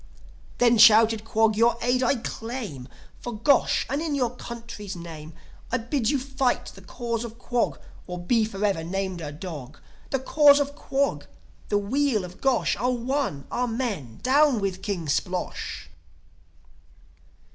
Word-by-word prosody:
"Then," 240 -2 +4
shouted 220 0 +7
Quog, 225 -1 +2
"your 230 +1 +3
aid 245 +2 +1
I 255 +2 +3
claim 225 - -6 0.3
For 240 - -6
Gosh, 250 +5 +3
and 280 +4 -2
in 315 -3 -1
your 250 -4 +1
country's 230 -5 -7
name 165 -2 -9 0.4
I 255 - +2
bid 235 0 -1
you 290 - +2
fight 265 -1 -1
the - - -13
Cause 235 -2 -4
of 230 -1 -8
Quog, 245 -1 -1 0.3
Or 180 -1 -5
be 220 +6 +2
for 210 -1 -2
ever 195 -6 0
named 190 0 -3
a 150 -2 -5
dog! 150 -4 -8 0.3
The 270 - +1
Cause 285 +2 +5
of 285 0 -1
Quog, 280 -1 -1 0.4
the 205 - +2
weal 230 +1 +1
of 180 +1 -12
Gosh 265 -3 +2
Are 245 +4 0
one! 250 - -1
Amen. 225 - -2
Down 275 -1 +4
with 190 -2 -2
King 195 -6 -3
Splosh!" 180 +5 -2
230 Hz, 150 wpm, -25 LUFS, 195-255 Hz, 0.4 s, shouted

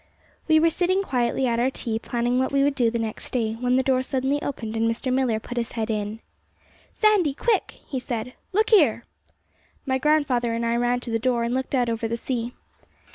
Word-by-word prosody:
We 315 -1 +5
were 330 +1 +4
sitting 370 +4 +1
quietly 255 -4 0
at 235 -2 +1
our 250 +2 +3
tea, 230 -4 -3
planning 240 +2 0
what 260 - 0
we 275 0 +3
would 285 0 +2
do 245 -4 +2
the 235 - -2
next 225 -2 -4
day, 225 -3 -1
when 250 0 +1
the 260 - +3
door 260 0 +2
suddenly 265 +2 -1
opened 225 -5 -4
and 225 0 +1
Mr. 250 +3 -2
Millar 255 -4 +1
put 245 +3 -8
his 235 - -4
head 225 -1 -2
in. 215 +1 -3 0.7
'Sandy, 400 -10 +3
quick!' 435 +3 0
he 265 - -3
said. 245 -1 -4 0.2
'Look 430 +4 +1
here!' 290 - +5 0.8
My 265 -1 0
grandfather 265 -5 +2
and 235 0 -1
I 230 0 +1
ran 245 +1 +1
to 240 - -6
the 225 - +1
door, 240 0 +1
and 235 +1 -1
looked 260 +1 -1
out 245 -2 +2
over 230 0 -1
the 230 +1 -2
sea. 240 -1 -3
250 Hz, 215 wpm, -24 LUFS, 230-275 Hz, 0.8 s, We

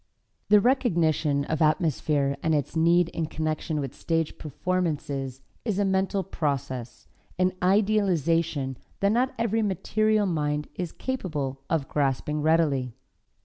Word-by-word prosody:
The 210 0 +7
recognition 165 - +2
of 160 +1 -2
atmosphere 150 -3 +2
and 160 -1 +2
its 145 +1 -2
need 170 +1 +4
in 165 -2 -3
connection 155 0 -2
with 135 -2 -4
stage 165 -2 -2
performances 145 -5 -2 0.2
is 215 -5 -1
a 205 - +2
mental 190 0 +1
process, 130 -7 -3 0.3
an 185 0 +2
idealization 170 - +2 0.2
that 200 0 +3
not 250 +4 +1
every 225 -1 +1
material 215 +2 +1
mind 150 -4 -1
is 180 -3 -4
capable 150 - -3
of 155 -5 0
grasping 145 +1 0
readily. 145 -6 +2
160 Hz, 125 wpm, -26 LUFS, 145-190 Hz, 0.3 s, The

